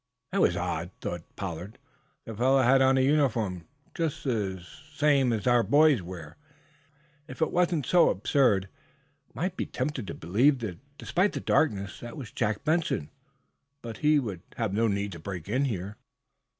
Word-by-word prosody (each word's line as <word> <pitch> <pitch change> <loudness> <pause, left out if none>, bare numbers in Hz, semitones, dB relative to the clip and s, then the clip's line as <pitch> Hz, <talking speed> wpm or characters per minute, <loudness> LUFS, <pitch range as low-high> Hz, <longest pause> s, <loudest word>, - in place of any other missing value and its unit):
"That - - +1
was - - +3
odd," - - -2
thought 85 - -4
Pollard. 90 +2 -6 0.5
"The 115 - -7
fellow 130 +4 +3
had 135 +2 +5
on 135 0 +4
a - - +4
uniform 120 - +1 0.3
just 155 -2 -2
such 100 -8 -2 0.4
as 135 -7 +3
our 120 -1 +4
boys 145 -2 +4
wear. 85 -4 -9 0.9
If 130 - -10
it 160 - +1
weren't 175 -5 +1
so 175 -1 +5
absurd, 105 -2 +2 0.6
I - - -9
might 185 +1 -1
be - - -3
tempted 130 -4 -3
to - - -5
believe, 125 - +2 0.4
despite 190 +4 0
the - - -3
darkness, 100 -10 0
that 120 -1 -8
it - - -10
was 125 -7 -8
Jack 105 0 -1
Benson. 155 - 0 0.7
But 115 -3 -7
he 150 +4 +3
would 105 - -3
have 110 -5 -2
no 115 +3 +2
need 100 -1 -1
to 85 - -8
break 90 -1 -6
in 130 +7 +1
here." 100 -4 -4
120 Hz, 165 wpm, -28 LUFS, 100-140 Hz, 0.9 s, had